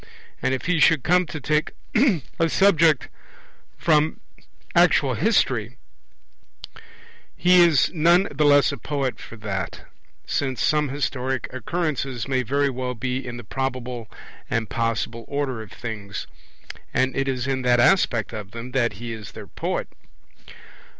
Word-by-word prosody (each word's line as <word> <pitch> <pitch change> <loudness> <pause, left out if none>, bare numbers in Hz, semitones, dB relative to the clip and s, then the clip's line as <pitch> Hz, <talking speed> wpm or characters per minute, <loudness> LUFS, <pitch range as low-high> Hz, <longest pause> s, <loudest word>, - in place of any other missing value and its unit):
And - - +1
if 130 - -7
he 180 -2 +1
should 150 -1 +4
come 180 0 +3
to 155 - -6
take 150 +1 0 0.7
a 165 0 +3
subject 165 -6 +4 0.7
from 155 -1 +2 0.5
actual - - +4
history, - - +1 1.6
he 180 0 +6
is 165 -5 +4
none 170 +4 +4
the 145 +2 0
less 145 -1 +5
a - - -6
poet 140 -3 -2
for - - -10
that; 95 -6 -4 0.4
since 130 -3 -2
some 150 -2 +2
historic 130 -2 -2
occurrences 135 -3 -2
may 130 -1 +1
very 140 +3 +1
well 125 0 -4
be 130 +3 -3
in 120 -1 -6
the 120 - -8
probable 125 -1 -4 0.4
and 115 -2 -2
possible 115 0 -2
order 140 -5 -2
of 110 - -11
things; 105 -3 -6 0.7
and 130 0 +1
it 135 0 0
is 130 -2 -1
in 135 -1 -1
that 125 -1 +3
aspect 120 - +3
of 105 -3 -6
them 115 +4 -8
that 120 -3 +1
he 115 +3 -6
is 110 -2 -9
their - - -9
poet. - - -3
130 Hz, 145 wpm, -23 LUFS, 120-150 Hz, 1.6 s, he